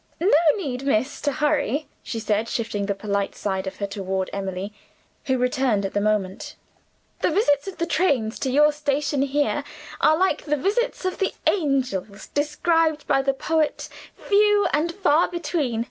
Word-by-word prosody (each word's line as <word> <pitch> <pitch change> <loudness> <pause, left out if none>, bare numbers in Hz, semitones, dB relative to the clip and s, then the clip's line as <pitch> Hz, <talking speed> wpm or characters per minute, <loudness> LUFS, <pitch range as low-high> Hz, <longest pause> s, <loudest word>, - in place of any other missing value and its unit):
No 360 +5 +2 0.2
need, 265 -10 -4
miss, 275 0 0
to 290 - 0
hurry," 295 0 0
she 230 - -5
said, 215 +1 0
shifting 205 -4 -2
the 200 - -1
polite 200 0 -2
side 190 -1 -3
of 190 - -5
her 200 - -3
toward 190 -1 -3
Emily, 195 +1 -4 0.5
who 260 -2 +1
returned 250 -5 +1
at 195 - -4
the 205 - +1
moment. 205 -3 -1 0.6
"The - - +2
visits 310 -4 +2
of 385 - -6
the 335 - 0
trains 280 -11 +1
to 265 - -1
your 300 +3 +5
station 290 -1 -1
here 285 +1 0 0.4
are 310 - +4
like 375 +2 +1
the 300 -1 0
visits 410 - -1
of 370 - -2
the 385 - 0
angels 255 - 0
described 310 +1 +1
by 270 -1 +2
the 275 0 0
poet, 315 +2 -1 0.3
'few 415 0 +3
and 320 +3 +1
far 340 -3 +3
between. 310 -9 -2
275 Hz, 165 wpm, -23 LUFS, 215-315 Hz, 0.6 s, your